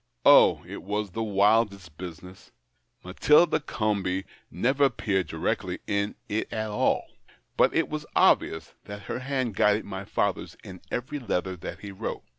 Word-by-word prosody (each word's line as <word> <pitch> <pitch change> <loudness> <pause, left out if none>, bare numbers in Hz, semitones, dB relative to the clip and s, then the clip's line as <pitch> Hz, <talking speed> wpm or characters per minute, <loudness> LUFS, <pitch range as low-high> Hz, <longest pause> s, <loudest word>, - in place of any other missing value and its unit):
Oh, - - +7
it - - -8
was 105 +1 -3
the 115 - -4
wildest 100 -4 +1
business! 90 +2 -10 0.5
Matilda 150 - +4
Comby 100 -8 -1 0.3
never 130 - +2
appeared 95 -9 0
directly - - -2
in 100 0 -1
it 105 +2 -2
at 110 -1 -3
all. 105 - +1 0.5
But - - +3
it 165 - +2
was 150 0 -5
obvious 80 0 +3
that 100 0 -8
her - - -4
hand 130 -3 -2
guided 105 +2 +3
my 95 -1 -6
father's - - -2
in 90 -1 -10
every 130 +4 -3
letter 95 -6 -2
that 85 - -8
he 100 - -7
wrote. 95 - -5
105 Hz, 150 wpm, -27 LUFS, 95-120 Hz, 0.5 s, Oh